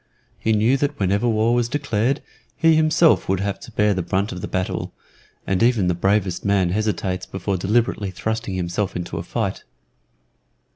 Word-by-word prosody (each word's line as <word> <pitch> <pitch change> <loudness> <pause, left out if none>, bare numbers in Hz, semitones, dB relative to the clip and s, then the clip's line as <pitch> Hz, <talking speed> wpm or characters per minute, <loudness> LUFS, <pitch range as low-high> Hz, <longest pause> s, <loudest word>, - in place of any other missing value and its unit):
He 110 - 0
knew 110 +5 +3
that 145 +1 -2
whenever 100 +4 +1
war 110 +1 +2
was 120 -1 +1
declared, 135 -2 0 0.3
he 165 -1 +4
himself 155 - +3
would 95 -1 +1
have 100 0 -2
to - - -11
bear 105 -1 +2
the 95 - -1
brunt 95 +4 -1
of 90 - -6
the - - -4
battle, 95 0 -3 0.5
and 95 -1 0
even 115 -6 +3
the - - +2
bravest 95 +1 0
man 100 -3 +2
hesitates 95 -2 -1
before 95 +1 -3
deliberately 105 +2 0
thrusting 110 +2 -3
himself 90 +2 -2
into 90 0 -4
a - - -4
fight. - - -3
105 Hz, 175 wpm, -22 LUFS, 95-115 Hz, 0.5 s, he